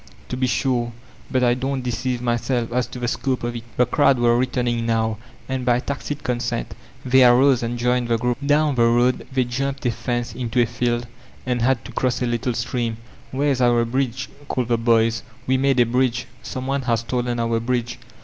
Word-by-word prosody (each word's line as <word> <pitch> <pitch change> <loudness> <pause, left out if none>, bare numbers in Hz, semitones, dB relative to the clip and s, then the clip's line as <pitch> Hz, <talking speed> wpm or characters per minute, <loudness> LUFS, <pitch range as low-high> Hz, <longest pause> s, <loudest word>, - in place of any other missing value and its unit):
"To - - -2
be 130 0 0
sure. 120 0 0 0.4
But 130 -1 +1
I 120 -1 +4
don't 130 +1 -2
deceive 125 +1 -2
myself 120 0 -1
as 125 -2 +1
to 125 - -9
the 120 0 -2
scope 130 0 -1
of 120 0 -2
it." 115 - -5
The 125 - +5
crowd 140 +1 +3
were 120 0 +3
returning 120 -1 0
now, 110 -1 0 0.3
and 130 -1 -2
by 120 0 +3
tacit 140 +2 -5
consent 120 - -2 0.3
they 130 0 +5
arose 125 +1 +5
and 120 +1 -2
joined 125 0 +1
the 115 -1 +2
group. 125 +2 -1
Down 145 +1 +3
the 120 -2 +3
road 120 +2 +2
they 130 -1 +2
jumped 135 +3 -3
a 120 - +3
fence 120 0 -3
into 120 0 -2
a 120 - +5
field 120 +1 -1 0.4
and 125 -1 0
had 125 0 +1
to - - -8
cross 125 -2 0
a - - +2
littk 120 0 -1
stream. 115 -1 -2 0.3
"Where 140 +2 +1
is 130 -2 0
our 120 -1 +4
bridge?" 130 +1 -1 0.2
called 125 -4 -2
the 120 - +3
boys. 115 -1 +3 0.2
"We 130 0 +2
made 135 -1 +2
a 120 - +6
bridge. 125 0 0 0.2
Some 130 0 -5
one 135 +1 0
has 115 -1 +2
stolen 120 0 -2
our 115 0 +1
bridge." 120 0 -2
125 Hz, 205 wpm, -22 LUFS, 120-130 Hz, 0.4 s, a